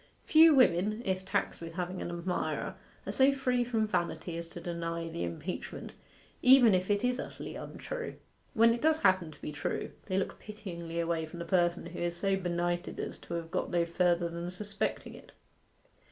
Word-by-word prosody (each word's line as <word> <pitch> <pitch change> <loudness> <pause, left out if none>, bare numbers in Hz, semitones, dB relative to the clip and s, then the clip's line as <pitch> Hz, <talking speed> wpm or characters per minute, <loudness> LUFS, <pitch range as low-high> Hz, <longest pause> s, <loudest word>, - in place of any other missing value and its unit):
Few 320 +1 +8
women, 215 -2 +3
if 190 0 -1
taxed 190 - -1
with 165 0 -7
having 180 +1 -3
an - - -3
admirer, 175 +1 -2 0.3
are - - -2
so 270 +1 +5
free 250 -2 +1
from 230 -2 +1
vanity 175 -3 -2
as 170 0 -5
to 175 - -8
deny 170 -1 -3
the 125 - -4
impeachment, 85 -1 -5 0.5
even 250 -4 +8
if 185 +1 +1
it 205 +1 +2
is 250 +1 +1
utterly - - -6
untrue. - - -6 0.4
When 230 +1 +6
it 235 - -4
does 315 0 +3
happen 185 -4 +4
to 155 - -15
be - - -3
true, 145 -1 -3 0.2
they 190 -2 0
look 195 - -2
pityingly 170 -6 -6
away 165 -1 0
from 165 - -10
the 170 - -5
person 175 -1 +2
who 170 +1 -7
is 175 0 -2
so 195 +2 +1
benighted 175 -1 -2
as - - -4
to 170 - -6
have 165 -1 -5
got - - -1
no 170 -1 +2
further 175 0 +2
than 170 +1 -5
suspecting 200 +3 -3
it. - - -14
180 Hz, 190 wpm, -31 LUFS, 170-215 Hz, 0.5 s, Few